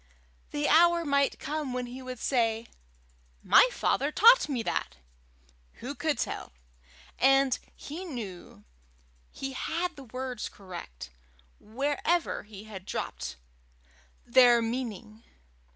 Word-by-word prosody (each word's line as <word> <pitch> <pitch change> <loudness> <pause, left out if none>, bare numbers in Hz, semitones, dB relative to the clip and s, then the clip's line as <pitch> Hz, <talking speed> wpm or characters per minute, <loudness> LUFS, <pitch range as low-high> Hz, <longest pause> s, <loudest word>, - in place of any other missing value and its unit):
The 295 0 -1
hour 340 +2 +5
might 280 -1 +2
come 300 -4 -4
when 250 0 -2
he 250 +2 -8
would 255 -1 -7
say, 230 -2 0 0.8
"My - - +7
father 290 - 0
taught 465 +2 +6
me 250 -5 -1
that!" - - -3 0.8
who - - -7
could - - -1
tell? - - -4 0.7
And 270 0 +4 0.2
he 320 +6 -7
knew 205 - -8 0.7
he 270 0 -6
had 340 +5 -2
the 275 -2 -11
words 255 -1 -5
correct, 175 - -10 0.5
wherever 290 +9 -1
he 210 -1 -12
had 195 -3 -10
dropped - - -4 0.9
their 240 -1 +6
meaning. 225 -2 -4
255 Hz, 115 wpm, -29 LUFS, 225-290 Hz, 0.9 s, My